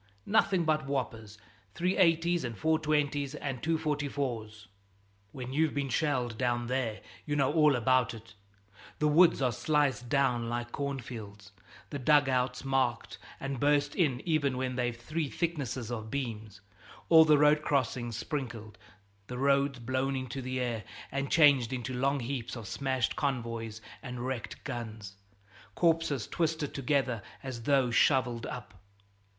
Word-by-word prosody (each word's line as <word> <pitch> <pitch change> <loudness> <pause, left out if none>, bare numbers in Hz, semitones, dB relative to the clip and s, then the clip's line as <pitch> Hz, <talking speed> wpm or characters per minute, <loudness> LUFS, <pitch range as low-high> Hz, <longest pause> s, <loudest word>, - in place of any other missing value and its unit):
Nothing 195 -5 +2
but 155 -2 +1
whoppers, 115 -6 -3 0.4
380's 175 -2 +2
and 120 -2 -4
420's 150 -1 +1
and 135 -4 -4
244's. 140 -9 -2 0.6
When 130 -1 -6
you've 155 +1 +1
been 140 -1 -1
shelled 125 -4 0
down 120 -1 0
there 120 -3 -2 0.3
you 145 - 0
know 140 0 +2
all 150 -3 +5
about 125 0 +2
it 110 0 -13 0.6
the 150 - +2
woods 160 -1 +5
are 125 - +3
sliced 140 -2 0
down 125 -4 +1
like 120 0 -3
cornfields, 110 -7 -6 0.4
the 145 - -3
dug 145 +2 +4
outs 125 0 0
marked 135 -3 0 0.2
and 135 -1 -4
burst 145 +1 +2
in 140 -8 +1
even 145 -6 +1
when 130 -1 -2
they've 120 -1 -1
three 155 +4 -3
thicknesses 135 -9 -3
of 110 -2 -5
beams, 110 -6 -5 0.5
all 160 -1 +8
the 155 -2 +5
road 150 +1 +5
crossings 120 -5 -1
sprinkled, 115 -5 -5 0.5
the 125 - -6
roads 140 0 +2
blown 130 +3 -1
into 130 0 -4
the 130 0 -3
air 120 -3 -2 0.3
and 140 +1 -2
changed 140 -7 +5
into 130 0 -3
long 135 +2 0
heaps 120 -1 -4
of 115 -4 -7
smashed 130 -1 -1
convoys 115 -5 -3 0.2
and 125 -1 -6
wrecked 130 -3 -5
guns, 110 -7 -6 0.6
corpses 165 -7 +1
twisted 160 -3 -1
together 135 -4 0 0.2
as 130 -3 -5
though 130 -1 +2
shoveled 120 -2 +2
up. 110 -4 -7
130 Hz, 140 wpm, -30 LUFS, 120-145 Hz, 0.6 s, all